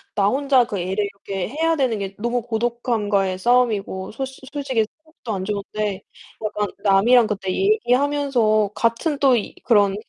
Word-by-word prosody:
나 200 -1 +3
혼자 270 0 +3
그 215 -4 -4
애를 190 +3 -1
이렇게 195 -2 -5
해야 320 +5 0
되는 255 -5 +1
게 195 -1 -5
너무 240 +2 -1
고독함과의 220 -5 -1
싸움이고 215 -5 +1
솔 265 +5 -3 0.3
솔직히 270 -6 0
새벽도 315 -7 -10
안 190 -2 -3
좋은데 205 -1 -3 0.4
약간 210 -1 -1 0.2
남이랑 225 +5 +5
그때 195 -2 -3
얘기하면서 275 - +2
같은 230 +6 0
또 265 -3 +5
이 210 - -5
그런 205 -4 +3
225 Hz, 320 characters per minute, -22 LUFS, 200-255 Hz, 0.4 s, 남이랑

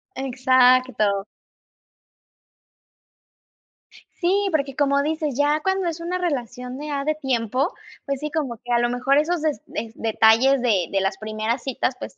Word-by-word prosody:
Exacto. 255 -5 +3 2.9
Sí, 390 +3 +1
porque, 280 -3 -1
como 280 -1 +2
dices, 305 -3 -2
ya 295 +1 +2
cuando 380 0 0
es 335 0 -3
una 350 +2 -3
relación 250 -6 -4
de 300 +1 -6
ya 280 -1 -2
de 310 +1 +1
tiempo, 260 - -1 0.3
pues 275 -2 -2
sí, 300 0 -4
como 275 -8 -2
que 245 - -6
a 235 - +4
lo 240 0 +1
mejor 255 +3 +1
esos 325 +2 +1
des 300 -7 -1 0.3
detalles 225 +4 +4
de 200 -9 +1
de 195 -1 +1
las 195 0 -1
primeras 215 +3 -2
citas, 270 - -1
pues, - - -8
270 Hz, 150 wpm, -23 LUFS, 240-300 Hz, 2.9 s, a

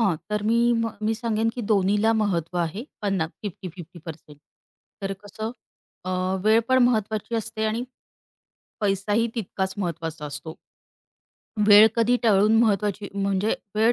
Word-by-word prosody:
हां, 195 -7 +3
तर 210 -1 -1
मी 230 - +3 0.3
म 225 - -1 0.2
मी 225 - +1
सांगेन 225 0 0
की 245 - -4
दोन्हीला 205 +2 +3
महत्व 175 -4 -1
आहे, 170 +7 -2 0.2
पन्ना 195 -6 0 0.2
50-50% 170 -5 -9 0.6
तर 195 0 -2
कसं? 215 +2 -5 0.5
अ, 185 - -3 0.3
वेळ 220 +1 +5
पण 260 0 +4
महत्वाची 220 -1 -1
असते 220 0 -3
आणि 220 +3 -1 1.0
पैसाही 205 +2 +1
तितकाच 190 -4 -3
महत्वाचा 165 -4 -4
असतो. 150 +3 -7 1.1
वेळ 210 +1 +9
कधी 235 +1 +3
टळून 215 0 +4
महत्त्वाची 205 -1 0
म्हणजे 200 +1 0 0.2
वेळ 225 +3 +4
205 Hz, 130 wpm, -24 LUFS, 185-220 Hz, 1.1 s, वेळ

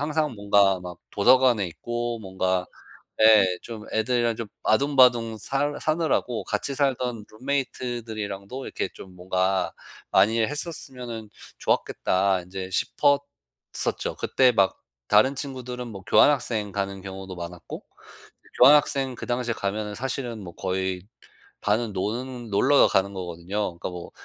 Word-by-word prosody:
항상 150 -2 0
뭔가 100 -2 +3
막 90 -1 -8
도서관에 120 0 +4
있고 120 +7 -4
뭔가 95 -2 -1 0.6
예, 110 -3 +8 0.2
좀 110 -2 -8
애들이랑 120 +1 +1
좀 115 -1 -5 0.2
아등바등 125 -3 +4
살 145 +6 -1
사느라고 155 -7 0
'같이 110 +6 -2
살던 125 -5 -1
룸메이트들이랑도 120 -3 -4
이렇게 - - -3
좀 95 -1 -12
뭔가 95 +1 0 0.4
많이 110 +3 +4
했었으면은 125 -5 -4 0.3
좋았겠다.' 95 0 +1
인제 95 +1 -7
싶었었죠. 140 - -1
그때 130 -1 +3
막 100 -4 +2 0.3
다른 130 +7 +4
친구들은 125 -3 -5
뭐 100 -4 -8
교환학생 115 -8 +3
가는 100 -1 -3
경우도 95 -1 -8
많았고 85 0 -8 0.6
그 - - -23
교환학생 135 -1 +5
그 - - -7
당시에 120 -1 -1
가면은 105 0 -3
사실은 125 -3 -4
뭐 85 - -9
거의 95 -1 -2 0.6
반은 105 0 0
노는 120 +4 -4
놀러 135 +8 +5
가는 100 +1 +1
거거든요. 90 +1 -4
그러니까 - - -4
뭐 90 -1 -8
110 Hz, 300 characters per minute, -25 LUFS, 95-130 Hz, 0.6 s, 예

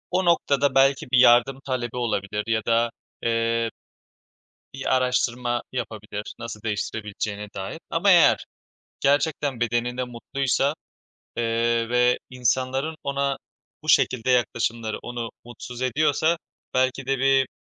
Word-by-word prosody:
O 185 +1 +1
noktada 140 -5 +2
belki 135 0 +4
bir 130 - +5
yardım 125 +2 +5
talebi 125 -3 -3
olabilir 105 -3 -1
ya 110 -1 +1
da 115 0 +2 0.3
eee 115 0 +1 1.0
bir - - 0
araştırma 125 -1 0
yapabilir, 105 -4 -5
nasıl 115 -3 -7
değiştirebileceğine 105 -1 -4
dair. 95 0 -5
Ama - - +2
eğer - - +5 0.5
gerçekten 145 -2 +1
bedeninde 120 +2 0
mutluysa, 135 +3 -1 0.6
eee, 115 0 +1
ve 125 0 +3
insanların 130 +4 0
ona 140 0 -1 0.5
bu 155 - -5
şekilde 130 -3 +3
yaklaşımları 115 -2 0
onu 120 -1 -5 0.2
mutsuz 120 +1 -9
ediyorsa 155 +5 +2 0.4
belki 130 +1 +1
de 135 0 0
bir 135 0 +3
125 Hz, 115 wpm, -24 LUFS, 115-135 Hz, 1.0 s, bir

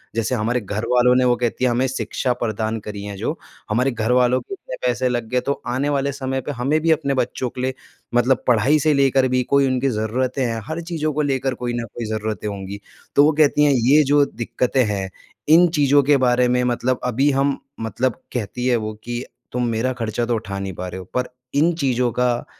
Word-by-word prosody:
जैसे 115 +2 0
हमारे 120 +2 0
घर 105 +2 -4
वालों 125 0 +4
ने 130 0 +3
वो 125 -1 +4
कहती 120 +1 -1
है - - +3
हमें 125 +2 +1
शिक्षा 130 0 -2
प्रदान 110 0 -2
करी 105 -1 -6
जो - - -3 0.3
हमारे 125 +5 +1
घर 115 0 -1
वालों 125 0 +3
के 160 - -9
इतने 185 - -7
पैसे 125 +1 +1
लग 120 -2 -2
गए 125 - +1
तो 140 - -2
आने 130 +4 0
वाले 140 -1 0
समय 135 -1 -3
पर 145 - -5
हमें 140 +4 0
भी 165 +1 +2
अपने 140 -3 +1
बच्चों 130 -1 -1
के 125 - -7
लिए 130 +1 -1 0.4
मतलब 125 +2 +3
पढ़ाई 125 +5 +4
से 155 +1 +3
लेकर 135 -1 +3
भी 130 0 +1
कोई 140 -1 +4
उनकी 130 +1 +1
ज़रूरतें 125 +4 -1
हैं 115 -1 -2
हर 160 +2 -3
चीज़ों 165 -2 -2
को 150 - 0
लेकर 135 -2 0
कोई 120 -1 -1
न 120 -1 -3
कोई 120 - -5
ज़रूरतें 110 0 -3
होंगी। 100 0 -6 0.4
तो 145 - +7
वो 155 - +5
कहती 150 -1 +4
हैं 145 - +5
ये 135 +5 +4
जो 145 +1 +4
दिक्कतें 125 +1 -1
हैं 100 -2 -2 0.4
इन 170 +3 +7
चीज़ों 145 -1 +4
के 145 +1 +4
बारे 125 -1 +3
में 125 0 +2
मतलब 125 +1 0
अभी 130 +4 +2
हम 135 0 +1 0.2
मतलब 115 +2 -2
कहती 125 +1 -3
है 125 - +3
वो 110 -1 -4
कि 120 +1 -4 0.3
तुम 125 0 -1
मेरा 115 +3 0
ख़र्चा 120 -1 -2
तो 120 0 0
उठा 100 -3 -4
नहीं 95 -1 -4
पा 90 +1 -6
रहे 95 - -6
हो 95 - -9
पर 125 0 0 0.3
इन 160 +4 +3
चीज़ों 125 -3 +1
का 125 0 0
125 Hz, 225 wpm, -21 LUFS, 115-135 Hz, 0.4 s, तो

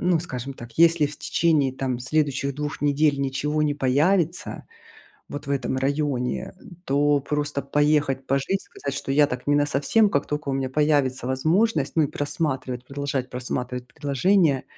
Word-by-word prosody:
Ну, 175 -1 +2
скажем 130 -5 -5
так, 120 -2 -11
если 165 -2 +5
в 145 +1 -8
течение 150 -3 +1
там 130 -2 -2
следующих 140 0 0
2 150 +1 -4
недель 145 0 +2
ничего 150 +3 -1
не 145 -1 +1
появится, 155 +6 +1 0.6
вот, 145 - -6
в - - -1
этом 130 -2 -1
районе. 135 -2 -1
Э, - - -20 0.2
то 145 +1 +2
просто 145 -1 -2
поехать 145 -1 +1
пожить, 140 +9 0
сказать, 140 -1 -6
что 135 - -4
я 145 +1 +4
так 125 -2 -5
не 145 - +3
насовсем, 145 +9 +2
как 140 -4 0
тока 150 -1 -3
у - - 0
меня 135 -1 -1
появится 145 -4 +1
возможность, 155 - +1
ну, 160 - +4
и 145 - +1
просматривать, 135 -4 -3
продолжать 140 -2 -3
просматривать 125 0 -4
предложения. 145 +2 +1
145 Hz, 160 wpm, -24 LUFS, 130-150 Hz, 0.6 s, если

